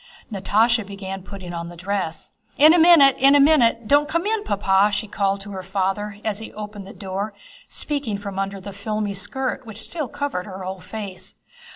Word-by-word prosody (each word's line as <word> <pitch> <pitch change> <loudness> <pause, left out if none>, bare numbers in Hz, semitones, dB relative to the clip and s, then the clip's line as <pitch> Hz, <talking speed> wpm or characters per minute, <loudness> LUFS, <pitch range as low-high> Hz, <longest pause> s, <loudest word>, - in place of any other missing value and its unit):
Natásha 220 +3 +2
began 195 -1 -7
putting 185 -2 -9
on 170 0 -5
the 175 - -10
dress. 180 -2 -3 0.3
"In 305 +3 +8
a 350 - +4
minute! 320 -5 +7
In 275 +2 +6
a - - +6
minute! 240 -6 +4
Don't 290 +3 +4
come 335 +3 0
in, 435 0 0
Papa!" 200 - +2
she 215 +1 -2
cried 200 -1 -1
to 205 +1 -8
her 190 -1 -5
father 195 +2 -2
as 215 -1 -1
he 220 - -8
opened 210 -2 -8
the - - -9
door—speaking 205 +5 -4
from 200 -1 -6
under 195 0 -3
the 195 +1 -8
filmy 210 0 -3
skirt 255 +7 -3
which 220 - -8
still 310 -5 -3
covered 270 -9 -4
her 190 -1 -7
whole 190 0 -5
face. 190 -1 -8
205 Hz, 190 wpm, -22 LUFS, 195-240 Hz, 0.3 s, In